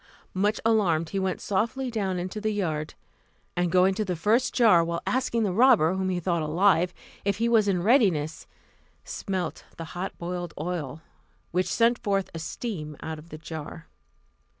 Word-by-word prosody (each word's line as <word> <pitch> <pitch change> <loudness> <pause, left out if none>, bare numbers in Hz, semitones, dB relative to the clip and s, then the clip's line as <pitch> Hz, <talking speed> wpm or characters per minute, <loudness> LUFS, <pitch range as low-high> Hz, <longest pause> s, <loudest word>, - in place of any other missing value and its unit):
Much 205 +3 +1
alarmed, 175 -8 +2
he 195 - -1
went 190 -1 -1
softly 230 +6 -1
down 195 -5 -1
into 185 +4 -4
the 215 - 0
yard, 160 -7 -2 0.6
and 175 -1 0
going 185 +1 +4
to 215 +3 -1
the 185 -3 -2
first 220 +9 +2
jar, 215 -9 +5
while 170 0 -3
asking 250 -3 0
the 195 -4 0
robber, 220 -7 +5
whom 190 0 -1
he 180 -1 0
thought 170 -1 0
alive, 175 +2 +3 0.3
if 200 -1 0
he 230 +2 +1
was 225 -3 +4
in 180 -3 +1
readiness, 185 - +2 0.6
smelt 185 -5 -4
the 165 - -5
hot 180 +2 -4
boiled 175 -1 -5
oil, 160 -3 -4 0.5
which 180 +1 +1
sent 235 +3 +2
forth 195 -4 -1
a 165 - -5
steam 160 - -5
out 160 -1 -5
of 160 +2 -15
the 155 - -8
jar. 155 - -8
185 Hz, 175 wpm, -26 LUFS, 165-215 Hz, 0.6 s, jar